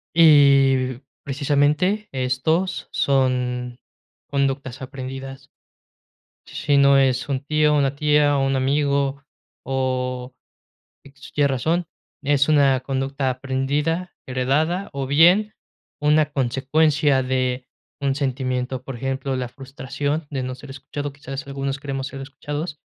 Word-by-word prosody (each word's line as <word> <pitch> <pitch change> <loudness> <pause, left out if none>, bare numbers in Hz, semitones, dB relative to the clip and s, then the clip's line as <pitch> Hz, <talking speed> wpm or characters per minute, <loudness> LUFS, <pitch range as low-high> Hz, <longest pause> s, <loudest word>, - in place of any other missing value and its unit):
Y, 135 -5 +5 0.2
precisamente, 150 +9 +1
estos 135 +8 -1
son 125 -2 0 0.5
conductas 135 -1 -1
aprendidas. 135 +1 -7 1.0
Si 145 -1 0
no 140 0 +6
es 135 0 +2
un 135 -1 -1
tío, 150 +1 +2
una 140 -1 +1
tía, 150 0 +3
o 135 - +1
un 135 0 +1
amigo, 140 +1 0 0.4
o 130 -1 -2 1.0
tiene 145 -1 +3
razón, 160 +7 0 0.4
es 145 +1 +2
una 140 -3 +4
conducta 135 0 -2
aprendida, 140 +7 -1 0.2
heredada, 150 +9 0
o 140 -2 -3
bien 175 +9 +5 0.5
una 150 0 +3
consecuencia 140 +2 +2
de 130 -1 -1 0.3
un 135 -1 +1
sentimiento, 130 -2 -2
por 135 -1 -7
ejemplo, 135 +2 -2
la 130 -1 -2
frustración 140 +3 -4
de 135 -2 -2
no 130 0 -4
ser 135 +2 -13
escuchado, 145 +1 -6
quizás 135 -1 -7
algunos 135 0 -3
queremos 135 -1 -4
ser 135 -1 -8
escuchados, 145 +3 -6
135 Hz, 115 wpm, -22 LUFS, 130-145 Hz, 1.0 s, no